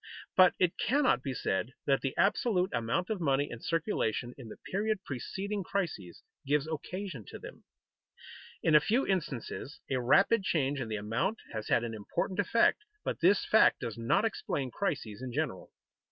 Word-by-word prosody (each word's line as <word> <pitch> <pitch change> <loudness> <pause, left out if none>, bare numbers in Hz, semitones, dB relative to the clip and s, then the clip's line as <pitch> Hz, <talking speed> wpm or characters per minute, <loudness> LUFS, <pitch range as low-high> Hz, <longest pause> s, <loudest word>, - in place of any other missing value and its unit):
But 185 -1 +6
it 180 -1 +1
cannot 260 - +3
be 130 -1 -4
said 110 +4 -1
that 135 -1 +2
the 135 - -3
absolute 195 -2 +2
amount 115 - -1
of 205 -4 -2
money 140 -2 +1
in 120 - -7
circulation 140 - -1
in 125 -5 -10
the - - -9
period 210 +1 -2
preceding 195 - -4
crises 160 - -4 0.2
gives 145 +1 +1
occasion 160 - -5
to - - -8
them. - - -11 1.0
In 160 - +3
a 150 - +9
few 235 - +1
instances 150 - -3
a 130 -1 +1
rapid 195 - +4
change 145 -7 0
in 120 - -3
the 110 - -3
amount 115 - -1 0.2
has 110 -1 -4
had 120 - +3
an 115 -1 -4
important 110 - -3
effect, 230 - +3 0.2
but - - -2
this 185 +4 +4
fact 220 - +5
does 115 -4 -4
not 115 - +1
explain 140 - -2
crises 125 - -3
in 130 -1 -5
general. 145 -7 -3
150 Hz, 170 wpm, -31 LUFS, 120-195 Hz, 1.0 s, a